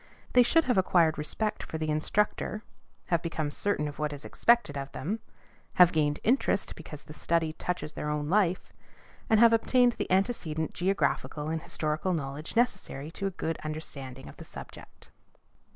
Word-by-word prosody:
They 250 - +7
should 325 +7 +4
have 250 -8 +2
acquired 170 -4 +3
respect 210 +8 -1
for 160 - -5
the 155 -1 -1
instructor; 210 +6 0 0.5
have 170 - +3
become 160 -3 -2
certain 150 -2 -1
of 145 - -8
what 150 -1 -1
is 145 0 -7
expected 235 -11 +2
of 140 0 -5
them; 200 +11 -3 0.5
have 180 -1 +7
gained 150 -2 +1
interest 240 -4 +1
because 150 -2 -9
the 150 - -11
study 160 0 0
touches 170 -1 -4
their 150 - -4
own 150 -1 -1
life; 185 0 +1 0.6
and 220 - +5
have 230 0 +7
obtained 245 +2 +4
the - - -2
antecedent 180 -6 0
geographical 175 -4 0
and 160 0 -2
historical 155 +4 -1
knowledge 145 +1 -4
necessary 190 - 0
to 195 +3 -3
a 190 - -6
good 165 0 -2
understanding 140 -4 -6
of - - -12
the - - -9
subject. - - -12
165 Hz, 170 wpm, -29 LUFS, 150-205 Hz, 0.6 s, They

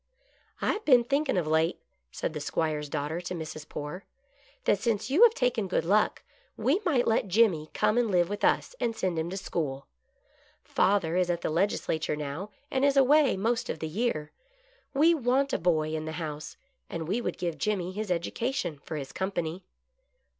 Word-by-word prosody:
" - - -32
I - - +2
have 430 - -5
been 250 -5 +6
thinking 275 -1 0
of 175 - +1
late," 160 +2 +1 0.3
said - - -3
the 150 - -4
'Squire's 150 0 -2
daughter 150 +3 -2
to 180 +1 -5
Mrs. 155 -2 -7
Poore, 150 +6 -6 0.3
" 280 0 -32
that 205 - +3
since 225 +1 -1
you 320 +10 +3
have 470 -1 +8
taken 245 -6 +1
Good 185 - 0
Luck, 210 +4 +2 0.3
we 310 +10 +2
might 270 -8 +2
let 220 -2 +2
Jimmy 185 -6 +3
come 215 +2 +3
and 235 -2 +1
live 175 -3 +3
with 205 +3 -5
us, - - +2
and 230 -1 -1
send 180 -5 -1
him 160 +2 -2
to 190 - -4
school. 145 -7 -3 0.8
Father 190 -4 +2
is 180 -1 +2
at 170 -1 0
the - - -1
Legisla 165 -2 0
ture 150 - -1
now, 150 +7 -5 0.2
and 265 0 +1
is 280 0 +3
away 275 -2 +5
most 230 +4 0
of - - -2
the 160 - -4
year. 155 -4 -2 0.6
We 320 +5 +5
want 275 -1 +1
a - - +1
boy 160 -3 +1
in 155 0 -3
the 160 - -4
house, 155 -2 -6 0.3
and 165 -2 -4
we 210 +7 0
would - - -3
give 170 -4 -3
Jimmy 185 -1 -1
his 210 +1 -4
educa 180 +8 -1
tion 160 - -3
for 155 - -7
his 135 -2 -6
company." 180 -2 -3
185 Hz, 200 wpm, -28 LUFS, 160-240 Hz, 0.8 s, have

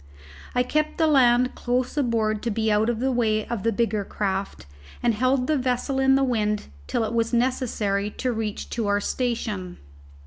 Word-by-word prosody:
I 250 - +3
kept 305 +4 -1
the 325 - +3
land 250 -4 +4
close 250 +1 -1
aboard 225 -6 0
to 235 - -2
be 220 0 0
out 210 +2 +2
of 235 -2 -1
the 265 +2 +1
way 220 -3 +1
of 235 -4 -4
the 230 - +1
bigger 215 -1 0
craft, 195 - -3 0.4
and 240 -1 +3
held 255 +3 +1
the 300 +1 +1
vessel 255 +2 -1
in 265 0 +4
the 270 - +3
wind 210 -5 0 0.2
till 235 - 0
it 220 +1 -3
was 230 +1 0
necessary 230 -5 0
to 255 - 0
reach 220 -2 -4
to 230 -3 -1
our 205 0 +2
station. 210 -6 -3
235 Hz, 185 wpm, -24 LUFS, 215-255 Hz, 0.4 s, land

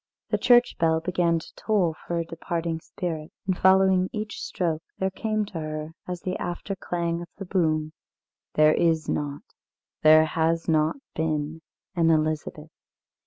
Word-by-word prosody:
The - - +2
church 245 -1 +4
bell 160 -1 +3
began 170 0 +1
to 160 - -9
toll 195 -7 +1
for 170 - -1
a 170 - -1
departing 165 0 -3
spirit. 160 -3 -5
And 190 -1 +1
following 190 0 +4
each 215 0 -5
stroke 165 -3 -2 0.2
there 190 0 0
came 215 +2 -1
to 190 -5 -6
her, 155 0 -5
as 180 -1 -4
the 185 0 -3
after 175 +3 -4
clang 170 -2 -2
of 175 - -7
the 195 - -6
boom: 155 -4 0 0.6
"There 155 0 +6
is 165 -2 +2
not, 145 -1 -2 0.6
there 155 0 +7
has 165 +1 0
not 155 -1 +2 0.2
been, 155 0 -2 0.3
an 165 -3 +3
Elizabeth. 155 0 0
165 Hz, 155 wpm, -26 LUFS, 155-185 Hz, 0.6 s, there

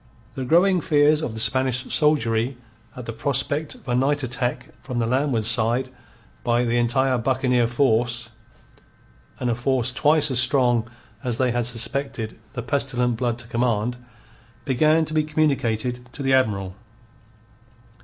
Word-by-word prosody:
The 130 0 -5
growing 175 +5 +3
fears 150 0 +3
of 115 -8 -4
the - - -5
Spanish 130 +2 +1
soldiery 125 -5 +2 0.4
at 125 - -8
the 115 - -5
prospect 140 +5 -1
of - - -20
a 120 - -1
night 140 +3 +1
attack 125 0 -2
from 125 -3 -6
the 115 - +1
landward 125 -2 0
side 115 +3 +2 0.5
by 120 0 +1
the 120 0 +1
entire 130 +2 +1
buccaneer 125 -1 +1
force 120 -1 0 1.1
and 125 - -2
a 120 - +1
force 125 +1 0
twice 150 +2 +2
as 125 - +3
strong 125 -3 +3 0.3
as 120 -2 -1
they 125 -1 +1
had 120 -1 -1
suspected 120 -1 -3
the 125 - -5
pestilent 125 -2 0
Blood 120 -1 -1
to 120 -1 -10
command 120 0 -1 0.7
began 155 +4 +2
to 155 - -7
be 155 -1 +2
communicated 125 -6 0
to 140 - -6
the 135 0 +2
Admiral. 100 -8 0
125 Hz, 150 wpm, -23 LUFS, 120-140 Hz, 1.1 s, growing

